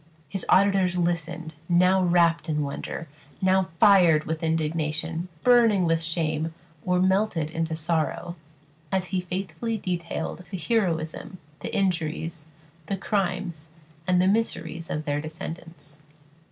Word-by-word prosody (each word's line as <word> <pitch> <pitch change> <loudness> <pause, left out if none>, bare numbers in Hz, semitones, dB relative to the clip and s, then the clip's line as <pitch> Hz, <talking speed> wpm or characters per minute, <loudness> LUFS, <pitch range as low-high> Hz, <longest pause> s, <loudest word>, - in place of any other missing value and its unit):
His 185 +5 -4
auditors 190 -2 +4
listened, 170 -1 -1 0.2
now 180 +2 +4
wrapt 170 -1 +3
in 150 -1 +1
wonder, 145 +3 -5 0.3
now 190 -1 +2
fired 180 -7 +6
with 160 0 -3
indignation, 160 +1 -1 0.2
burning 230 -7 +5
with 165 0 +2
shame, 160 -1 -1 0.3
or 180 0 +2
melted 190 -4 +1
into 165 0 -2
sorrow, 165 +2 -1 0.6
as 185 -1 0
he 185 -1 0
faithfully 185 +4 -3
detailed 180 -2 -3
the 190 - -4
heroism, 175 -4 -1 0.2
the - - -5
injuries, 165 -4 -1 0.4
the 195 - -1
crimes, 185 -5 -2 0.4
and 180 -1 +4
the 185 - +4
miseries 170 -6 -1
of 155 0 -3
their 145 -1 0
descendants. 155 -1 -7
170 Hz, 125 wpm, -26 LUFS, 160-185 Hz, 0.6 s, fired